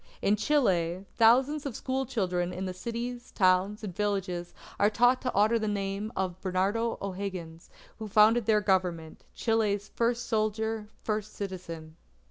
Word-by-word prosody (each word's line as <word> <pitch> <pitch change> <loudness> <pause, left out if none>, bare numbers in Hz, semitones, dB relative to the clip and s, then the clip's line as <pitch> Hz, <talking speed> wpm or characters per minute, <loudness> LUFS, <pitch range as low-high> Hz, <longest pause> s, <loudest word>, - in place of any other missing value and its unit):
In 205 - +2
Chile, 190 - +1
thousands 260 +6 +4
of 250 - -6
school 265 0 -2
children 180 -7 -1
in 185 +1 -4
the 185 - -3
cities, 240 +5 -5
towns, 190 +2 +2
and 190 -5 -5
villages 190 -4 -2 0.3
are 205 - +5
taught 245 +4 +3
to 255 - -2
honour 215 +3 +4
the 215 - -2
name 200 +1 -2
of 185 -1 -2
Bernardo 200 +5 0
O'Higgins, 185 -4 -5 0.3
who 220 - -5
founded 215 +2 +4
their 215 -1 +4
Government, 180 -5 -1
Chile's 210 -3 0
"first 235 0 0
Soldier, 220 -1 -1
first 215 -1 -3
Citizen." 170 -5 -7
205 Hz, 145 wpm, -29 LUFS, 185-225 Hz, 0.3 s, are